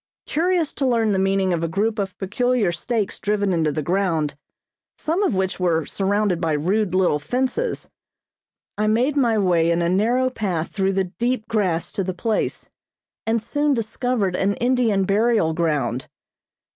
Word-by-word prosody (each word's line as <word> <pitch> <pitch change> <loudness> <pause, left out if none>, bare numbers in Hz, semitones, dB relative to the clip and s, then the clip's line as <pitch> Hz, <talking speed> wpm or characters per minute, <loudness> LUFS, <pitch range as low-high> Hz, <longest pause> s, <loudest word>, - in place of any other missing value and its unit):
Curious 335 0 0
to 270 - -1
learn 230 -3 +2
the 195 - +1
meaning 195 -1 +1
of 165 - -1
a - - +1
group 215 +6 -1
of 195 -2 -3
peculiar 215 +1 0
stakes 210 +4 -2
driven 205 -2 0
into 160 -3 +1
the 150 +1 -3
ground, 170 -4 0 0.6
some 330 +5 -1
of 390 - +1
which 190 0 -1
were 165 -4 +1
surrounded 200 -2 0
by 165 -2 +1
rude 185 +5 0
little 180 -5 +2
fences, 260 - -2 0.9
I 215 - +2
made 245 +7 +2
my 235 -6 +2
way 175 -4 +2
in 170 0 +1
a 170 - +1
narrow 240 +7 +2
path 185 -9 -2
through 195 -1 0
the 195 0 +1 0.2
deep 240 -1 0
grass 180 -7 0
to 195 - -2
the 185 -1 -3
place, 220 +3 -2 0.6
and 225 +1 +2
soon 290 +6 0
discovered 225 -3 -1
an 200 +2 +1
Indian 240 -5 +2
burial 210 -4 +2
ground. 140 -7 -1
200 Hz, 165 wpm, -22 LUFS, 175-235 Hz, 0.9 s, learn